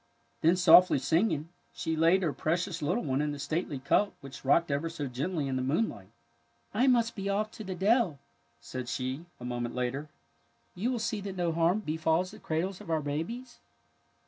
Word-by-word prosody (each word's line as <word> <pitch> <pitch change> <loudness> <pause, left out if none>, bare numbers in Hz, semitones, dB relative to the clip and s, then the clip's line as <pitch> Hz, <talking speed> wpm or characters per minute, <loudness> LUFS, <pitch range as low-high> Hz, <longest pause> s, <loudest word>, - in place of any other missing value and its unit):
Then, 165 +3 +5
softly 180 -1 +7
singing, 160 - +1 0.2
she 160 - -2
laid 165 +4 +4
her 155 -4 0
pre 155 +6 0
cious 180 -1 -4
little 180 +11 0
one 135 -2 0
in 150 0 0
the 145 - -5
stately 155 0 -2
cup 140 +10 +2
which 135 -1 -10
rocked 150 +4 +3
ever 145 +4 -1
so 155 -3 -4
gently 140 +4 -2
in 130 -1 -1
the - - -1
moonlight. 130 - -1 0.4
'' 80 0 -40
I 245 +6 +3
must 235 -3 +3
be 195 -1 -3
off 210 +2 0
to 220 - -8
the 185 -2 -5
dell,'' 200 - +2 0.4
said 120 +11 -6
she, 130 +6 -3
a 125 - -8
moment 120 -1 -3
later. 130 +4 -2 0.3
*' 80 0 -41
You 220 +8 -1
will 250 - -1
see 220 -2 -2
that 195 -1 -5
no 175 -2 +1
harm 170 +5 +2
befalls 160 +1 0
the 215 - -12
cradles 175 +3 -2
of - - -11
our 160 -1 +1
babies? 165 - -4
165 Hz, 200 wpm, -30 LUFS, 140-190 Hz, 0.4 s, softly